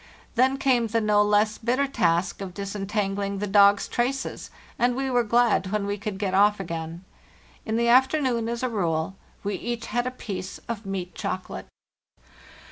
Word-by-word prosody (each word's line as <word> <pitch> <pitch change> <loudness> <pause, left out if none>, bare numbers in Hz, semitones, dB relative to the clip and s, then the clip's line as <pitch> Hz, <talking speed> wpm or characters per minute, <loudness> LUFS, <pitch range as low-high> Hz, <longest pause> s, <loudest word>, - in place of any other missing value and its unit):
Then 260 +3 +3
came 255 -4 +2
the 230 +1 +1
no 210 -1 +3
less 210 +1 +2
bitter 250 +5 +1
task 175 -9 0
of 185 -3 -6
disentangling 200 0 -2
the 205 - -2
dogs' 200 0 +5
traces, 260 +3 -2 0.3
and 245 +1 +2
we 265 0 -1
were 245 -1 +3
glad 235 -3 +2
when 210 -1 0
we 200 0 -1
could 205 -1 -5
get 195 -2 -2
off 205 +2 +4
again. 165 -1 -5 0.6
In 220 +1 0
the 235 0 +2
afternoon, 255 -2 +3
as 235 +1 -3
a - - +2
rule, 170 -4 -1 0.3
we 205 0 -2
each 235 +4 -4
had 240 +1 -1
a - - +1
piece 195 -7 -6
of 225 -3 -5
meat 185 -2 -4
chocolate. - - -5
210 Hz, 170 wpm, -25 LUFS, 195-240 Hz, 0.6 s, dogs